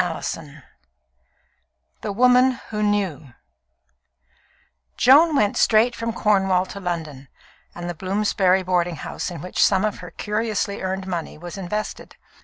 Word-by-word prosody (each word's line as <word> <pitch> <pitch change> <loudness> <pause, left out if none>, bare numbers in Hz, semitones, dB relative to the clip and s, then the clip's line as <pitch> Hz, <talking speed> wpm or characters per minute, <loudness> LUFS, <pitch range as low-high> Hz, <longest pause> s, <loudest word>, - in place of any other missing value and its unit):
CHAPTER 165 -2 -3
VII 150 -1 -14 1.4
The 210 - -3
Woman 250 +3 +4
Who 210 -1 -2
Knew 190 -10 -1 1.6
Joan 300 +5 +6
went 210 -6 +2
straight 230 +2 +4
from 230 0 -3
Cornwall 195 -4 +2
to 200 - -7
London 160 -7 -5 0.5
and 175 0 -6
the 175 - -3
Bloomsbury 190 +1 +1
boarding 175 -2 0
house - - -5
in 170 -4 -7
which 180 - 0
some 195 +1 +3
of 215 - -3
her 180 - -9
curiously 210 +1 -2
earned 190 0 -3
money 175 -5 -5
was 175 +3 -8
invested. 205 +3 -5
190 Hz, 135 wpm, -22 LUFS, 175-215 Hz, 1.6 s, Joan